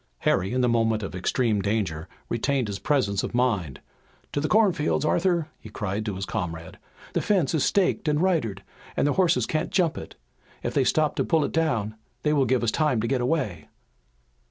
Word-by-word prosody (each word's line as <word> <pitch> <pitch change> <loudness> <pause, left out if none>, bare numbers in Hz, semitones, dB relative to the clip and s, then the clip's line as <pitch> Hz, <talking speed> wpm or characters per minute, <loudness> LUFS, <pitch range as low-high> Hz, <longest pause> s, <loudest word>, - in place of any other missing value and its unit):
Harry 95 +3 +1
in 130 +1 +1
the 125 - +3
moment 115 -2 +1
of 100 - -5
extreme 105 +3 0
danger 95 -6 -2 0.2
retained 130 +1 0
his 100 -1 -4
presence 105 -9 +1
of - - -4
mind: 100 - 0 0.5
"To - - -1
the 155 - 0
cornfield, 185 -9 +2
Arthur!" 170 -1 +1
he 110 - -11
cried 105 0 -3
to 105 - -2
his 95 +1 -4
comrade. 85 -6 -5 0.3
"The - - +1
fence 185 -9 +1
is 155 - +2
staked 190 -4 +1
and 150 0 +2
ridered, 135 - 0 0.3
and - - +2
their 145 - +2
horses 180 -2 +2
can't 155 - -1
jump 175 -4 +1
it. - - -10 0.5
If - - -2
they 135 - +2
stop 155 +2 +2
to - - +2
pull 160 -4 +2
it - - -4
down 115 -10 0 0.3
they 150 - +2
will 140 -3 +3
give 125 0 +1
us 115 - +2
time 150 -5 +1
to 115 - -1
get 130 -1 0
away!" 105 - -1
125 Hz, 200 wpm, -25 LUFS, 105-155 Hz, 0.5 s, the